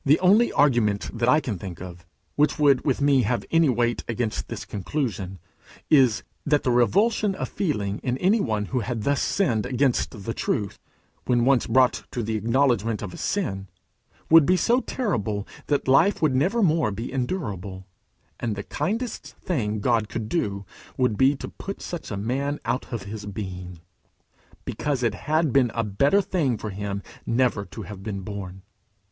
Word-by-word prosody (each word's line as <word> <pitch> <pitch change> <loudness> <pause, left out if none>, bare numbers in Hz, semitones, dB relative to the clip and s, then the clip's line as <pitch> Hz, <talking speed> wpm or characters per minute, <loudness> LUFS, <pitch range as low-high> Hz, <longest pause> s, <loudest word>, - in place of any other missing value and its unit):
The 145 +3 +4
only 205 +6 +5
argument 120 -8 +2
that 120 +1 +1
I 150 - +6
can 120 - -4
think 90 -2 -7
of, 90 -1 -10 0.3
which 150 0 +2
would 140 -3 +4
with 140 -1 0
me 140 -2 +4
have 120 +2 -1
weight 120 -8 +2
against 115 -2 -2
this - - -6
conclusion, 100 - -3 0.5
is, 130 -7 +5 0.2
that 150 -1 +2
the 125 - +1
revulsion 200 - +2
of - - -3
feeling 105 - -2
in 125 -1 -2
any 195 +9 +3
one 110 - -1
who 130 - +2
had 115 -1 -3
thus 140 +2 +1
sinned 120 - +1
against 125 -5 0
the 115 - -2
truth, 105 -3 -2 0.5
when 120 -1 +3
once 135 -2 +3
brought 130 -1 +3
to 120 - -1
acknowledge 120 +1 +2
his 105 -4 -4
sin, 100 - -2 0.6
would 165 -1 +8
be 185 - +4
so 240 +6 +3
terrible 110 - -2 0.2
that 145 -2 0
life 165 +10 +4
would 155 -4 +2
never 190 - +2
more 160 - +3
be 110 +5 -5
endurable, 105 - -3 0.5
and 115 -3 -2
the 100 - -5
kindest 220 - -3
thing 110 - -2
God 115 -2 +1
could 110 -2 -4
do 100 - -2 0.3
would 125 -4 +2
be 135 +5 +4
to - - -7
put 195 - -7
such 175 -2 -6
a 105 - -4
man 135 +7 -2
out 130 - -2
of 105 -2 -6
being, 90 -4 -6 0.8
because 140 -4 -2
it 115 - +2
had 155 -2 0
been 135 -3 +4
a 115 - +1
better 140 - +2
thing 145 - 0
for 110 - -5
him 100 0 -4 0.2
never 115 -4 +1
to 110 - -8
have 100 -1 -9
been 100 -1 -4
born. 95 -1 -7
120 Hz, 170 wpm, -25 LUFS, 105-145 Hz, 0.8 s, would